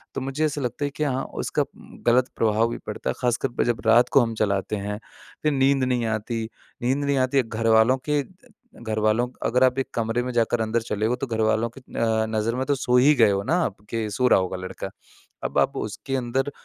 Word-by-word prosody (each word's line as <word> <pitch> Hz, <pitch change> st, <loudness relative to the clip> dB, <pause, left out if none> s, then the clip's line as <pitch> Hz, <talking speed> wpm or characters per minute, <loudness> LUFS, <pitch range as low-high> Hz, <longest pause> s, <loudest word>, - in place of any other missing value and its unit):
तो 135 Hz, -, -2 dB
मुझे 135 Hz, +4 st, -1 dB
ऐसा 145 Hz, -1 st, -2 dB
लगता 125 Hz, +3 st, -2 dB
है 145 Hz, -, -3 dB
कि 155 Hz, -, -1 dB
हाँ 135 Hz, -2 st, 0 dB, 0.2 s
उसका -, -, 0 dB
उ -, -, -9 dB, 0.4 s
गलत 125 Hz, +1 st, +4 dB
प्रभाव 110 Hz, +1 st, +2 dB
भी -, -, -4 dB
पड़ता -, -, -4 dB
है। -, -, +1 dB
ख़ासकर 125 Hz, +2 st, +1 dB
पर -, -, +3 dB
जब 120 Hz, -1 st, 0 dB
रात 115 Hz, +2 st, +5 dB
को 140 Hz, -, +5 dB
हम 115 Hz, -1 st, -1 dB
चलाते 100 Hz, 0 st, 0 dB
हैं, 105 Hz, +1 st, -4 dB, 0.4 s
फिर 150 Hz, -, +3 dB
नींद 135 Hz, -1 st, +3 dB
नहीं 125 Hz, -2 st, +1 dB
आती, 110 Hz, +1 st, -2 dB, 0.4 s
नींद 135 Hz, +4 st, 0 dB
नहीं 140 Hz, -1 st, +1 dB
आती 130 Hz, +1 st, +3 dB
घरवालों 115 Hz, +2 st, +3 dB
के 145 Hz, -1 st, +3 dB, 0.6 s
घरवालों 110 Hz, +2 st, +1 dB, 0.2 s
अगर 125 Hz, +2 st, +3 dB
आप 130 Hz, 0 st, +3 dB
1 135 Hz, -, -2 dB
कमरे 115 Hz, +1 st, 0 dB
में 125 Hz, -, -3 dB
जाकर 115 Hz, 0 st, +1 dB
अंदर 110 Hz, +1 st, 0 dB
चले 105 Hz, -1 st, -2 dB
हो 120 Hz, +2 st, +1 dB
तो 130 Hz, +2 st, -4 dB
घरवालों 110 Hz, 0 st, +1 dB
की -, -, -10 dB
अ, 110 Hz, -1 st, +1 dB
नज़र 110 Hz, +2 st, -1 dB
में 130 Hz, +1 st, -1 dB
तो 145 Hz, -, +1 dB
सो 125 Hz, -1 st, +2 dB
ही 145 Hz, +4 st, +6 dB
गए 110 Hz, -5 st, +5 dB
हो 100 Hz, 0 st, 0 dB
ना 165 Hz, -, +1 dB
आप 100 Hz, -, -4 dB
कि 115 Hz, -2 st, -2 dB
सो 125 Hz, +4 st, +2 dB
रहा 95 Hz, -, +5 dB
होगा 95 Hz, 0 st, -2 dB
लड़का। 95 Hz, 0 st, -6 dB, 0.5 s
अब -, -, 0 dB
आप -, -, +1 dB
उसके 120 Hz, +6 st, -4 dB
अंदर 130 Hz, +2 st, -1 dB
120 Hz, 225 wpm, -24 LUFS, 110-130 Hz, 0.6 s, ही